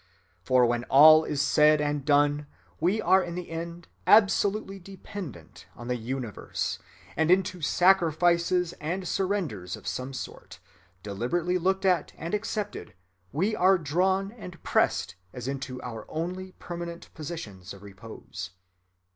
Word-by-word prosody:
For 125 +6 +4
when 120 0 0
all 155 +3 +8
is 145 -1 0
said 150 +1 +5
and 145 -1 -1
done, 145 0 +2 0.3
we 185 +7 +1
are 190 -2 +4
in 175 -2 -5
the 180 -2 -6
end 170 +1 -6 0.2
absolutely 205 -1 +3
dependent 180 - -10
on 120 +1 -9
the 125 - +1
universe; 120 -1 -4 0.4
and 160 0 +1
into 185 -1 +2
sacrifices 175 0 +3
and 180 +4 -3
surrenders 165 - -2
of - - -14
some 130 +1 -4
sort, - - -8 0.5
deliberately 160 - -1
looked 190 +2 0
at 185 -2 +2
and 165 +3 -6
accepted, 210 - -3 0.4
we 195 +9 0
are 190 0 +4
drawn 190 +5 0
and 180 -7 -11
pressed - - +1 0.2
as 125 0 -6
into 135 -2 -4
our 115 -2 -7
only 185 +3 -4
permanent 170 -1 -8
positions 110 - -7
of 100 0 -11
repose. 100 +3 -9
165 Hz, 135 wpm, -27 LUFS, 135-185 Hz, 0.5 s, all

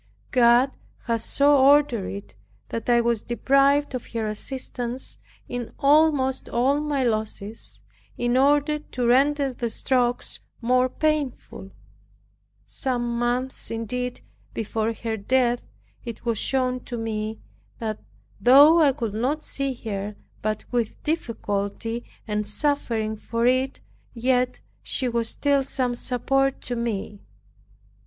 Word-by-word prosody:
God 245 +1 +5 0.3
has 230 -2 -1
so 285 +1 +4
ordered 275 -6 +4
it 200 0 -8 0.3
that 230 +1 -4
I 240 0 +5
was 235 -2 +1
deprived 275 +4 +2
of 255 - -5
her 225 -1 -1
assistance 245 +2 -4 0.3
in 245 -2 -5
almost 285 -2 +3
all 265 +5 +2
my 295 -3 0
losses, 215 -2 -3 0.4
in 240 0 +1
order 290 +3 +3
to 250 -4 -4
render 275 +2 +3
the 235 -1 -3
strokes 245 +1 0 0.2
more 250 +2 +2
painful. 290 -10 -2 1.0
Some 240 -3 -2
months 245 +2 -2
indeed 245 +2 -3 0.3
before 225 0 -1
her 225 0 -3
death, 245 +3 +1 0.4
it 235 -1 -8
was 230 -3 0
shown 255 -1 0
to 240 - -5
me, 220 -1 -3 0.4
that 220 -2 -3 0.4
though 290 +7 +8
I 285 -3 +5
could 230 -6 -3
not 270 +8 -1
see 275 -1 -2
her 205 0 -3 0.3
but 215 0 -2
with 240 -3 -2
difficulty, 225 -5 -2 0.2
and 210 -1 -1
suffering 225 -3 -1
for 230 +2 -2
it, 255 +2 +1 0.3
yet 250 +1 +1 0.2
she 255 - -1
was 235 -1 0
still 285 -1 +1
some 255 -2 -1
support 270 +2 0
to 245 - -4
me. 215 -3 -3
245 Hz, 125 wpm, -24 LUFS, 230-270 Hz, 1.0 s, though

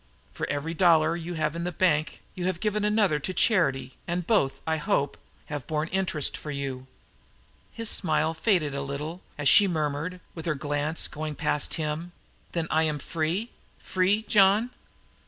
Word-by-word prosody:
For - - -4
every 145 +3 -2
dollar 165 -2 +4
you 170 +1 -5
have 155 -1 -1
in 170 - -3
the 180 - -2
bank 160 -3 0
you 180 - -4
have 185 -3 -1
given 210 0 -1
another 210 -7 +2
to 185 +6 -4
charity, 165 - +2
and 175 0 -2
both, 135 -11 +2
I 160 0 0
hope, 145 -2 0 0.3
have 145 -3 -6
borne 155 0 -1
interest 185 -6 -1
for 150 - -7
you!" 135 -2 -4 0.8
His 230 0 -5
smile 160 -4 +3
faded 165 -4 +1
a 140 - -2
little, 150 +6 -5 0.2
as 145 -1 0
she 200 +8 +8
murmured, 155 +1 -2
with 165 0 -7
her 155 - +1
glance 145 +2 +1
going 155 0 -5
past 150 - 0
him: 160 +3 -3 0.4
"Then 170 -2 -1
I 160 - +3
am 155 -2 0
free? 165 - -2 0.3
Free, 190 +4 +1
John?" 210 +3 +4
160 Hz, 170 wpm, -27 LUFS, 150-185 Hz, 0.8 s, she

